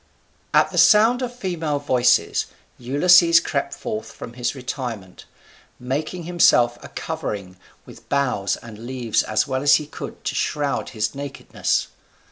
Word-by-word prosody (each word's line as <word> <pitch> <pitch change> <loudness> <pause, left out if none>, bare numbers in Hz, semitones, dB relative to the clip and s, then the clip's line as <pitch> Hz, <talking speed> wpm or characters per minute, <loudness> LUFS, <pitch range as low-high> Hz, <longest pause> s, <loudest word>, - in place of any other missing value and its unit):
] - - -38
At - - -3
the - - 0
sound 225 +4 +5
of 250 -1 -3
female 170 -9 -2
voices 130 -3 +2 0.3
Ulysses 170 +6 +5
crept 140 -4 -2
forth 110 -4 -5
from 115 - -10
his 120 +2 -3
retirement, 120 -7 -6 0.5
making 150 +8 -4
himself 125 -8 +3
a - - -8
covering 105 - -5 0.3
with - - -15
boughs 125 -8 0
and 115 0 -11
leaves 125 -4 0
as 110 0 0
well 130 -1 -2
as 145 0 +6
he 150 - -1
could 150 - -9
to - - -2
shroud 145 -2 -1
his 110 -2 -2
nakedness. 140 0 -2
135 Hz, 145 wpm, -22 LUFS, 120-160 Hz, 0.5 s, as